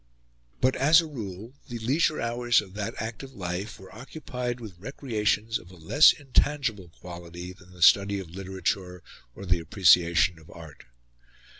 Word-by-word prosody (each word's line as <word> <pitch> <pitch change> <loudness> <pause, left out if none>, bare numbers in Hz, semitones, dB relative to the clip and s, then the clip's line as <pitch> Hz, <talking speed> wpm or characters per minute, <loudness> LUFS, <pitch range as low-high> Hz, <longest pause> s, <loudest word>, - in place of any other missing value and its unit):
But 130 0 +3
as 155 +5 +6
a 165 - -1
rule 110 - -8 0.2
the 120 - -5
leisure 145 +7 +1
hours 120 0 +2
of 95 -3 -8
that 105 +2 -4
active 115 +5 -6
life 95 +1 -5
were 95 -1 -14
occupied 125 -1 -6
with 100 -7 -10
recreations 110 -2 -1
of 90 - -16
a 90 - -14
less 90 - +6
intangible 135 - -1
quality 85 +1 -9
than 90 0 -19
the 90 -1 -3
study 100 +1 +5
of 90 -4 -9
literature 95 -1 -4 0.3
or 100 - -9
the 90 -1 +1
appreciation 85 -2 +3
of 80 +1 -18
art. 80 -3 -13
100 Hz, 155 wpm, -27 LUFS, 90-120 Hz, 0.3 s, as